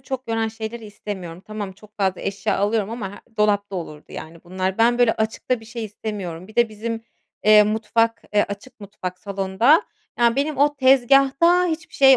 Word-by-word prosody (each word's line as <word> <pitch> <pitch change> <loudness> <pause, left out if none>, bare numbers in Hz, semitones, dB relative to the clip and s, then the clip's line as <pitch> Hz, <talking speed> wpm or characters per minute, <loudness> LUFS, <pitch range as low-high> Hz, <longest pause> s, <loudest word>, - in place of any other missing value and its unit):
çok 260 -1 -6
yoran 225 0 0
şeyleri 220 +1 -6
istemiyorum. 190 -4 -7
Tamam, 210 -3 -5
çok 210 +2 -19
fazla 190 -2 0
eşya 200 -1 -1
alıyorum 205 +1 +1
ama 215 -4 -5
he 225 +2 -18
dolapta 205 -2 +1
olurdu, 155 -4 -7
yani, 165 +1 -9
bunlar. 185 +3 -2
Ben, 240 +1 +4
böyle, 240 -2 +5
açıkta 220 +2 -1
bir - - -13
şey 225 0 -6
istemiyorum. 195 -5 -6
Bir 215 - -16
de 240 -1 +4
bizim, 225 +1 -5 0.4
eee, 215 0 +8
mutfak, 225 +2 +1
eee, 205 - +5
açık 205 +4 -9
mutfak, 185 -3 -6
salonda, 200 - +3 0.4
yani, 235 -1 +3
benim 290 +2 0
o 290 +1 +3
tezgâhta 275 +6 +5
hiçbir 335 +1 -4
şey 270 -2 +7
220 Hz, 180 wpm, -22 LUFS, 200-240 Hz, 0.4 s, eee